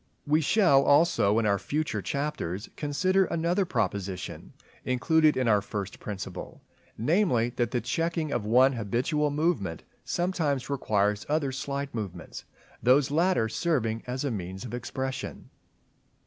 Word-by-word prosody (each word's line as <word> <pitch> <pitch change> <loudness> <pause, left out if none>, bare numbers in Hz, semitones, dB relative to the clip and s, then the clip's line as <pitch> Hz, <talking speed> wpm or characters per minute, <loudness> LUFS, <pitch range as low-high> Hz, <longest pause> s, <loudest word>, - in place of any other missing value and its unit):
We 150 +2 +3
shall, 155 -4 +4
also, 140 -8 +4
in 115 - +2
our 100 -1 +2
future 155 +8 -2
chapters, 140 - -3
consider 185 +6 +1
another 170 +4 0
proposition 100 - -3 0.3
included 155 +4 +3
in 130 -2 +1
our 105 -2 +4
first 100 -1 -5
Principle; 95 -3 -7 0.3
namely, 120 - +2
that 120 -2 +1
the 125 -1 -1
checking 165 +5 -1
of 120 -5 -1
one 125 +5 +4
habitual 125 +7 0
movement 145 - -1 0.2
sometimes 160 -7 -1
requires 105 -6 +1
other 150 -2 +1
slight 140 +1 -4
movements; 95 -6 -6 0.4
these 135 +3 +4
latter 170 -6 +2
serving 115 -5 -1
as 130 +3 -3
a 140 - 0
means 95 0 -5
of 120 - -7
expression. 130 +2 -5
130 Hz, 135 wpm, -28 LUFS, 110-155 Hz, 0.4 s, shall